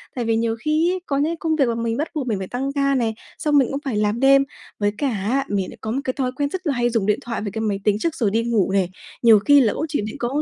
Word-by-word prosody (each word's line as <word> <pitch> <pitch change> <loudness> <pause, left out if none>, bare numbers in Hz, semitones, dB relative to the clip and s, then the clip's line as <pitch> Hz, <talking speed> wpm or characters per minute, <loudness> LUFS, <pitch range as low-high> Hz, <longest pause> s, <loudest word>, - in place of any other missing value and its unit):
Tại 245 -2 -2
vì 225 0 +1
nhiều 225 0 0
khi 310 +6 +1
ấy, 370 - -3
có 275 - -1
những 285 - +2
cái 330 +2 -1
công 320 -1 0
việc 285 -3 +3
mà 235 - 0
mình 230 0 -2
bắt 300 - -1
buộc 280 -4 -2
mình 215 -4 0
phải 190 -1 -5
tăng 270 +5 -3
ca 275 -1 +1
này, 230 -4 0 0.2
xong 295 -1 +2
mình 265 -3 +4
cũng 275 +1 -3
phải 250 -6 -1
làm 210 +2 0
đêm, 275 +1 +6 0.4
với 205 -1 +1
cả 280 - 0
á 235 +5 -1
mình 195 -2 -1
lại - - -12
có 220 - -3
một 255 - -1
cái 255 - -2
thói 255 -2 -1
quen 285 +1 -1
rất 370 +2 -5
là 290 - +2
hay 240 -1 +1
dùng 225 -4 0
điện 210 0 +1
thoại 235 0 -4
với 205 -1 -4
cái 220 +2 -4
máy 205 -3 -1
tính 210 0 +2
trước 330 +5 -1
rồi 225 -9 0
đi 225 +2 +1
ngủ 225 -5 +1
này. 190 -2 +1 0.3
Nhiều 225 -3 +7
khi 285 +7 +5
là 220 -5 +2
cũng 310 - -2
chỉ 290 - -1
định 215 - -6
có 260 +5 -1
240 Hz, 330 wpm, -22 LUFS, 220-280 Hz, 0.4 s, Nhiều